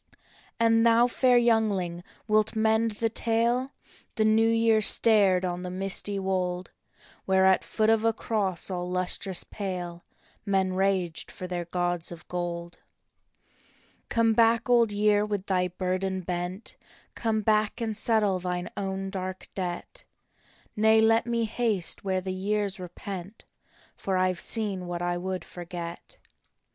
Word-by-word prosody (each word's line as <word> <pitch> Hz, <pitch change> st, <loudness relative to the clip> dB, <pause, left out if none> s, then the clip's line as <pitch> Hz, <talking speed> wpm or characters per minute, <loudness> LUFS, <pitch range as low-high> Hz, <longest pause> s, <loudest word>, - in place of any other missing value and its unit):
And 225 Hz, 0 st, +4 dB
thou, 230 Hz, +1 st, +5 dB
fair 245 Hz, 0 st, +3 dB
youngling, 205 Hz, -7 st, +1 dB, 0.2 s
wilt 215 Hz, +1 st, +2 dB
mend 220 Hz, +1 st, +2 dB
the 225 Hz, +2 st, -1 dB
tale? 235 Hz, +3 st, 0 dB, 0.2 s
" -, -, -28 dB
The 220 Hz, -, +2 dB
New 220 Hz, +1 st, +4 dB
Year 225 Hz, -1 st, +3 dB
stared 200 Hz, -5 st, +4 dB
on 175 Hz, 0 st, -3 dB
the 180 Hz, -, -5 dB
misty 195 Hz, +2 st, -1 dB
wold, 185 Hz, -2 st, -2 dB, 0.5 s
Where 190 Hz, 0 st, +3 dB
at 190 Hz, 0 st, +4 dB
foot 220 Hz, 0 st, +1 dB
of 225 Hz, -1 st, +2 dB
a 225 Hz, -, +3 dB
cross 200 Hz, -5 st, -2 dB
all 180 Hz, -1 st, -3 dB
lustrous 185 Hz, +1 st, +1 dB
pale 180 Hz, -4 st, -6 dB, 0.4 s
Men 190 Hz, -2 st, 0 dB
raged 185 Hz, -3 st, 0 dB
for 185 Hz, -, -8 dB
their 175 Hz, -1 st, -4 dB
gods 175 Hz, 0 st, -2 dB
of 170 Hz, -1 st, -11 dB
gold. 175 Hz, -1 st, -5 dB, 0.7 s
" -, -, -34 dB
Come 230 Hz, -1 st, +2 dB
back, 230 Hz, +1 st, +3 dB
Old 235 Hz, -3 st, +4 dB
Year, 205 Hz, 0 st, +3 dB
with 205 Hz, -2 st, -3 dB
thy 180 Hz, -2 st, +1 dB
burden 185 Hz, +1 st, -2 dB
bent. 180 Hz, +3 st, -5 dB, 0.4 s
Come 220 Hz, -2 st, -1 dB
back 215 Hz, +1 st, +1 dB
and 225 Hz, -2 st, -2 dB
settle 210 Hz, -4 st, +2 dB
thine 180 Hz, -1 st, -4 dB
own 195 Hz, 0 st, -4 dB
dark 185 Hz, -1 st, -6 dB
debt." 180 Hz, -2 st, -5 dB, 0.3 s
" -, -, -35 dB, 0.3 s
Nay, 220 Hz, +1 st, +4 dB
let 225 Hz, +1 st, +3 dB
me 235 Hz, -1 st, 0 dB
haste 220 Hz, -5 st, 0 dB
where 190 Hz, -1 st, -1 dB
the 185 Hz, 0 st, -4 dB
years 200 Hz, +1 st, -2 dB
repent, 185 Hz, +2 st, -8 dB, 0.5 s
For 190 Hz, -1 st, -2 dB
I 185 Hz, 0 st, +2 dB
ve 175 Hz, -, -10 dB
seen 200 Hz, -5 st, -1 dB
what 175 Hz, 0 st, -4 dB
I 175 Hz, 0 st, 0 dB
would 185 Hz, +1 st, -4 dB
forget." 175 Hz, -, -8 dB
195 Hz, 150 wpm, -27 LUFS, 180-220 Hz, 0.7 s, thou